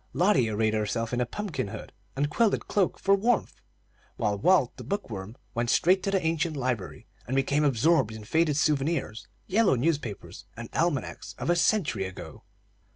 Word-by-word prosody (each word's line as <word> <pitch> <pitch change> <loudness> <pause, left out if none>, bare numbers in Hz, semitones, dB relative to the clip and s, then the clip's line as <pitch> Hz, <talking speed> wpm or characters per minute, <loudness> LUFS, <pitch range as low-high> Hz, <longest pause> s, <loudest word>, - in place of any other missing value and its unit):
Lotty 165 - +3
arrayed 110 0 +1
herself 110 +2 -1
in 125 - 0
a 120 - 0
pumpkin 155 - -4
hood 110 +2 -9 0.2
and 145 +2 +1
quilted 215 +8 +1
cloak 195 -3 +1
for 195 - +2
warmth, 220 +4 0 0.6
while 105 -1 0
Walt, 125 - +3
the 125 - -8
book 200 - -4
worm, 100 +4 -7 0.2
went 120 0 -1
straight 185 +8 +4
to 195 - -2
the 195 -1 +2
ancient 160 -1 0
library, 125 -7 -3 0.2
and 130 - -2
became 140 +2 +2
absorbed 140 -2 +3
in 110 -1 -8
faded 155 +5 +1
souvenirs, 145 -6 0 0.2
yellow 205 -5 +3
newspapers, 130 -5 -3
and 115 0 -7
almanacs 165 -5 -2
of - - -1
a - - +3
century 170 - +1
ago. 95 0 -9
140 Hz, 170 wpm, -27 LUFS, 115-175 Hz, 0.6 s, straight